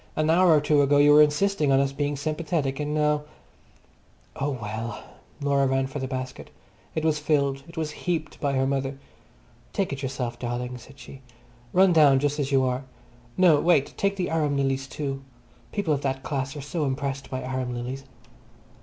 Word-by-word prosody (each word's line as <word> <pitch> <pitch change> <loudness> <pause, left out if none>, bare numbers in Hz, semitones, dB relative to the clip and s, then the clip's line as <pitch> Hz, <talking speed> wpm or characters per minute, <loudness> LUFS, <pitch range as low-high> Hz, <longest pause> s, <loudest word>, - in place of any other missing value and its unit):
An 155 +1 +2
hour 180 +2 +5
or - - +5
two 150 0 +3
ago 145 +1 +4
you 145 +1 +6
were 150 +1 +8
insisting 150 0 +2
on 135 - +5
us 135 0 +1
being 145 +1 -2
sympathetic, 150 -1 -2
and 150 0 -2
now—" 150 -1 +2 1.1
Oh 140 +2 -1
well! 110 0 -5 0.4
Laura 140 -1 +2
ran 135 0 +1
for 135 +2 -5
the 130 - -3
basket. 130 -1 -6 0.5
It 160 - -1
was 155 -1 +2
filled, 140 -3 +1
it 170 - -14
was 155 -2 -2
heaped 160 -1 -3
by 140 -2 0
her 135 0 +2
mother. 135 0 -1 0.8
"Take 190 -7 -1
it 135 - -6
yourself, 125 -3 -4
darling," 125 +1 -4
said 135 +3 -15
she. 135 - -12 0.5
"Run 185 0 +5
down 145 -4 +6
just 145 +1 -1
as 140 0 -1
you 135 -1 +4
are. 130 +1 -1 0.5
No, 175 -5 +6
wait, 160 -5 +3
take 200 0 0
the 185 -4 -2
arum 150 -3 +1
lilies 135 -1 0
too. 135 -1 -4 0.5
People 200 -7 0
of 140 - -1
that 135 -1 -2
class 135 -1 -3
are 145 - -5
so 150 +3 -2
impressed 135 -1 -3
by 130 0 -4
arum 130 -1 -3
lilies." 125 +3 -5
140 Hz, 190 wpm, -25 LUFS, 135-150 Hz, 1.1 s, were